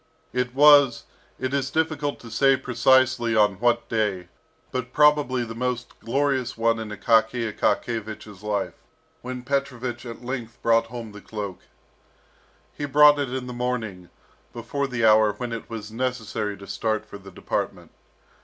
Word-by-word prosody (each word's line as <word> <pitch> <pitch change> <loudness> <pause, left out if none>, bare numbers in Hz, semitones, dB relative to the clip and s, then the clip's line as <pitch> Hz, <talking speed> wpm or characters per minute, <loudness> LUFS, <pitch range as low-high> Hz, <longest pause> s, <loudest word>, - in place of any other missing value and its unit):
It 125 0 -1
was 145 -3 +6 0.4
it 130 +1 -2
is 135 -2 0
difficult 155 -2 -1
to 115 - -11
say 135 +3 +4
precisely 130 -1 +2
on 105 -3 +3
what 120 0 +2
day, 105 -5 -1 0.4
but 125 0 -4
probably 150 -4 +3
the 115 - -7
most 125 +1 -4
glorious 135 0 -1
one 115 0 +2
in 110 -1 -5
Akaky 110 +1 +1
Akakiyevich's 110 -3 -2
life, 105 -1 -2 0.5
when 125 0 -6
Petrovich 125 -3 -3
at 115 +1 -9
length 120 -3 -5
brought 115 0 +3
home 115 -2 -7
the 105 0 -11
cloak. 100 -4 -6 1.1
He 145 - -4
brought 145 +1 +6
it 140 -3 -2
in 130 -1 -3
the 125 - -6
morning, 115 -8 -3 0.4
before 130 +5 -3
the 125 -3 0
hour 110 -1 +5
when 120 +3 -5
it 115 - -7
was 110 -2 -7
necessary 110 -4 -3
to 100 - -11
start 110 +2 -2
for 100 - -11
the 95 0 -12
department. 95 - -4
120 Hz, 155 wpm, -24 LUFS, 110-130 Hz, 1.1 s, was